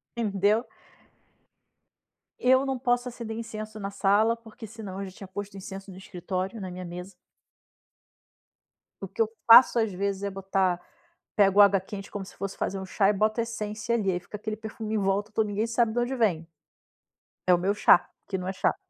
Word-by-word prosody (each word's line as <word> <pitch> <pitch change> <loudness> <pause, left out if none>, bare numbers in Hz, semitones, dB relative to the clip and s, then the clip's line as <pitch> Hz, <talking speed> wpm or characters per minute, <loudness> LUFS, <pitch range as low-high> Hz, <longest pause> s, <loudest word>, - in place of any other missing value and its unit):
Entendeu. 210 +1 +1 1.7
Eu 260 +2 +4
não 270 -1 -1
posso 245 0 +1
acender 230 -2 -6
incenso 215 -1 -6
na 200 -1 -4
sala, 205 +4 +3
porque 225 0 -12
senão 205 -3 -8
eu - - -3
já - - -9
tinha 195 - -9
posto 205 +2 -7
incenso 195 +1 -8
no 185 - -11
escritório, 190 +2 -4
na 185 -2 -6
minha 180 0 -7
mesa. 180 +2 -8 1.9
O 195 - -4
que 195 - -22
eu 225 - +4 0.2
faço, 235 +1 +9
às 220 -2 +1
vezes, 195 +1 -2
é 200 - -2
botar, 190 -2 0 0.6
pego 200 0 +6
água 200 -1 +6
quente 195 +1 -9
como 200 -2 -5
se - - -14
fosse 195 0 -5
fazer 195 - -2
um 190 - -6
chá, 195 +1 +2
e - - +3
boto 215 +3 +1
essência 230 0 -2
ali, 200 -4 +1
aí 175 - -1
fica 185 +4 -11
aquele 215 0 -4
perfume 220 0 -5
em - - +2
volta 200 +1 0
todo, 220 0 +1
ninguém 205 +2 -1
sabe 230 -1 +1
da 240 - +1
onde 245 +2 -1
vem. 180 -9 +1 1.0
É 180 - +6
o - - +5
meu 190 +3 +1
chá, 210 -4 +5 0.2
que 190 - -2
não 185 0 -5
é 190 - -2
chá. - - +1
205 Hz, 195 wpm, -27 LUFS, 195-225 Hz, 1.9 s, faço